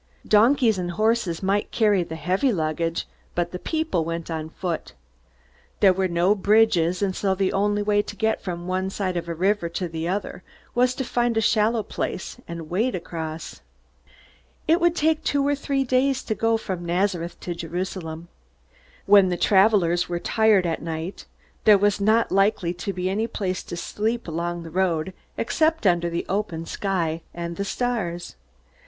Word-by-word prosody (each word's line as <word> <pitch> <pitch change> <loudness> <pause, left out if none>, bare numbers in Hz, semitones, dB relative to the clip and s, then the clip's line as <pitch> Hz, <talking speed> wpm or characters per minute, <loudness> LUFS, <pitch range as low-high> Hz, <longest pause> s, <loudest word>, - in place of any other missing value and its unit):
Donkeys 225 -1 +4
and 175 -1 -2
horses 215 -2 0
might 200 +2 +1
carry 210 -5 +3
the 160 -2 -5
heavy 185 - +1
luggage, 165 -2 -1 0.3
but 175 0 -1
the 180 - -5
people 315 - -1
went 165 +1 -4
on 160 -1 -4
foot. 170 0 -4 0.9
There 195 -2 +6
were 190 0 0
no 175 +3 +3
bridges, 200 -4 +3
and 190 -2 0
so 195 -1 0
the 190 0 0
only 205 +1 +1
way 205 0 +3
to 205 - -8
get 220 +2 0
from 175 -2 -5
one 185 +1 -1
side 190 -2 -2
of 170 -1 -3
a 170 - -3
river 190 0 +1
to 180 +2 -3
the 165 0 -4
other 190 0 -3 0.3
was 250 +1 +2
to 265 - -2
find 240 -2 0
a - - +5
shallow 220 0 +2
place 190 - -4
and 170 -2 -6
wade 215 +9 0
across. 165 -2 -6 1.1
It 330 +3 +4
would 345 0 +3
take 315 0 +1
two 280 -1 +1
or 290 - +3
three 275 -1 -1
days 260 +1 +1
to 220 - -1
go 225 +1 +1
from 185 -5 -5
Nazareth 175 0 -1
to 175 - -3
Jerusalem. 170 -1 -5 0.8
When 200 -2 +6
the 175 - -1
travelers 190 -3 +3
were 175 - -1
tired 220 -2 +3
at 165 -1 -1
night, 165 +3 -5 0.4
there 210 -2 +8
was 205 0 +1
not 220 +3 +3
likely 195 -3 +2
to 180 +3 -4
be 185 -1 -3
any 210 +4 0
place 185 -5 -3
to 175 - -6
sleep 225 +6 -2
along 170 +1 -3
the 165 - -9
road, 180 -1 0 0.2
except 315 +4 +1
under 175 -2 +3
the 170 0 -3
open 185 -5 -2
sky 170 -4 -2
and 170 0 -4
the 200 - -3
stars. 200 -8 -2
190 Hz, 175 wpm, -24 LUFS, 170-220 Hz, 1.1 s, there